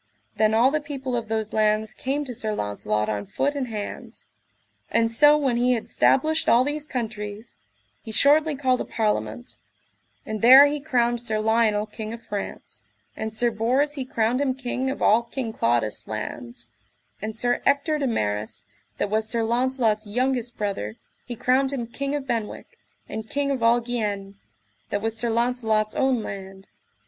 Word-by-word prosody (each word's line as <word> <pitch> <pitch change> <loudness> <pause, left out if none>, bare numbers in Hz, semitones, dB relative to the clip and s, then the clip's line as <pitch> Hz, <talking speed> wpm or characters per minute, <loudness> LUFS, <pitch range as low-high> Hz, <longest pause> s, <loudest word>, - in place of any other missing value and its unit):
Then 220 0 +3
all 245 +4 +5
the 305 +1 0
people 270 -4 -4
of 230 -2 -2
those 220 -1 -2
lands 215 0 +1
came 280 +3 -2
to 250 - -6
Sir 215 -2 -2
Launcelot 105 - -2
on 105 -1 -3
foot 285 - -1
and 275 -3 -3
hands. 210 -3 -7 0.6
And 230 0 +2
so 295 +5 +6
when 265 -5 +1
he 250 +1 +3
had 230 - -3
stablished 315 +4 +2
all 235 +2 +6
these 295 +2 -3
countries, 215 -3 -5 0.5
he 220 - -8
shortly 295 +6 +4
called 260 -2 +1
a - - -1
parliament; 225 +2 -2 0.7
and 215 -1 -4
there 260 +4 +10
he 290 +1 0
crowned 240 -5 0
Sir 220 -3 -2
Lionel, 215 -1 +2
King 215 +1 -7
of 235 - -9
France; 205 -1 -7 0.3
and 220 0 -4
Sir 235 +2 +1
Bors 255 +7 +1
[he] 275 -3 -3
crowned 245 0 0
him 265 -2 0
king 260 0 -2
of 270 - -3
all 220 +3 +5
King 235 -1 -5
Claudas' 115 - 0
lands; 120 +2 -6 0.5
and 215 +1 -4
Sir 245 +2 +1
Ector 300 +2 +2
de 275 - 0
Maris, 105 - -2 0.3
that 205 - -2
was 220 0 0
Sir 230 -1 0
Launcelot's 235 -2 +1
youngest 245 +1 -1
brother, 195 - -3 0.3
he 240 - -4
crowned 260 +4 +2
him 255 -4 -3
King 275 +4 -3
of 285 -2 -3
Benwick, 225 -5 -4 0.3
and 220 0 -6
king 280 0 0
of 265 -3 -2
all 230 +1 +4
Guienne, 205 -5 -3 0.5
that 205 +1 -2
was 225 0 -1
Sir 235 +1 0
Launcelot's 225 -2 +1
own 260 -4 +1
land. 195 -1 -8
235 Hz, 175 wpm, -24 LUFS, 215-260 Hz, 0.7 s, there